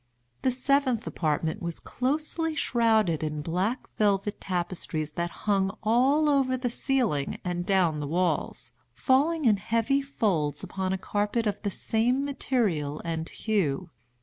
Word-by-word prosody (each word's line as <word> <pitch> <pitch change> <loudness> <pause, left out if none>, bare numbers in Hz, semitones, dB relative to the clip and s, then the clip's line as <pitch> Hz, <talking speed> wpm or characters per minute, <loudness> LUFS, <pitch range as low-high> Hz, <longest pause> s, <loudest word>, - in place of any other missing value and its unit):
The 260 - +2
seventh 255 -2 +1
apartment 160 +4 -1
was 170 -1 -4
closely 310 +4 -1
shrouded 220 - +2
in 150 -1 -3
black 185 - -1
velvet 205 -1 +1
tapestries 170 -4 -2
that 170 +2 -2 0.2
hung 195 -1 +1
all 260 +8 +3
over 270 -3 +2
the 250 -1 -2
ceiling 235 - 0
and 175 0 -2
down 180 -6 +2
the 145 - -3
walls, 160 -7 -1 0.2
falling 285 - +2
in 215 -3 +5
heavy 230 +7 +1
folds 180 - -1
upon 190 0 -3
a 190 - 0
carpet 205 +4 -1
of 205 -1 -1
the 205 - -1
same 240 +7 0
material 205 - -1
and 165 -1 -3
hue. 180 -7 -1
205 Hz, 140 wpm, -27 LUFS, 170-255 Hz, 0.2 s, in